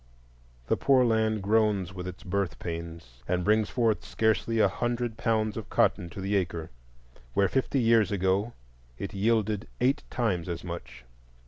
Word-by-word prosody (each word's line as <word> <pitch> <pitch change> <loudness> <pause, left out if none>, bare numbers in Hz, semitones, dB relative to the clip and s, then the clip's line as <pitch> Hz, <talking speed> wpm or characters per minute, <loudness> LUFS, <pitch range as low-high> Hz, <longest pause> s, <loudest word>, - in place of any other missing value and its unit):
The - - +1
poor 130 -2 +4
land 110 -2 +1
groans 105 -3 +2
with 90 -1 -6
its 90 +3 -8
birth 95 -3 -2
pains, 85 -7 -7
and 90 0 0
brings 105 +1 +2
forth 115 -4 +1
scarcely 110 +1 0
a 105 - +5
hundred 120 +2 -2
pounds 110 -1 0
of 110 - -6
cotton 85 - +2
to 105 - -9
the 100 +2 -1
acre, 85 -4 -2 0.6
where 100 - +4
fifty 135 +4 0
years 115 -4 +4
ago 100 +3 +1 0.4
it 100 - -5
yielded 110 0 +1
eight 130 +3 +2
times 95 -8 -1
as 85 0 -4
much. 65 -8 -8
105 Hz, 155 wpm, -28 LUFS, 90-110 Hz, 0.6 s, a